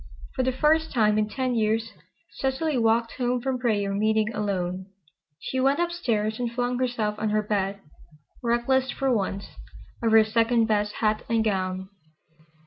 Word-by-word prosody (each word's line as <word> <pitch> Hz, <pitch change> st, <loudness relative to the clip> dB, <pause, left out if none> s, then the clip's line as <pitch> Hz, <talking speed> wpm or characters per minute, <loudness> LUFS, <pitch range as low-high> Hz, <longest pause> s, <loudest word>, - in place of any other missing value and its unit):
For 260 Hz, -, -1 dB
the 260 Hz, 0 st, +1 dB
first 315 Hz, +4 st, +2 dB
time 215 Hz, -3 st, +3 dB
in 210 Hz, 0 st, 0 dB
ten 255 Hz, +1 st, -1 dB
years 225 Hz, 0 st, 0 dB, 0.4 s
Cecily 270 Hz, +3 st, -1 dB
walked 230 Hz, -1 st, +2 dB
home 250 Hz, 0 st, 0 dB
from 260 Hz, 0 st, -2 dB
prayer 205 Hz, -5 st, 0 dB
meeting 215 Hz, +2 st, +1 dB
alone. 190 Hz, -3 st, -2 dB, 0.5 s
She 260 Hz, -, -3 dB
went 275 Hz, +4 st, +2 dB
up 345 Hz, 0 st, +1 dB
stairs 220 Hz, -10 st, -1 dB
and 240 Hz, -1 st, -2 dB
flung 245 Hz, +1 st, -1 dB
herself 225 Hz, -4 st, -1 dB
on 215 Hz, -, 0 dB
her 215 Hz, 0 st, +1 dB
bed, 200 Hz, -1 st, -1 dB, 0.6 s
reckless 255 Hz, +2 st, +1 dB
for 270 Hz, -1 st, 0 dB
once, 195 Hz, -1 st, -2 dB, 0.6 s
of 230 Hz, -1 st, +1 dB
her 220 Hz, 0 st, +7 dB
second 230 Hz, +1 st, +2 dB
best 210 Hz, -1 st, 0 dB
hat 215 Hz, 0 st, +1 dB
and 225 Hz, -1 st, +2 dB
gown. 190 Hz, -2 st, -2 dB
225 Hz, 160 wpm, -25 LUFS, 210-250 Hz, 0.6 s, her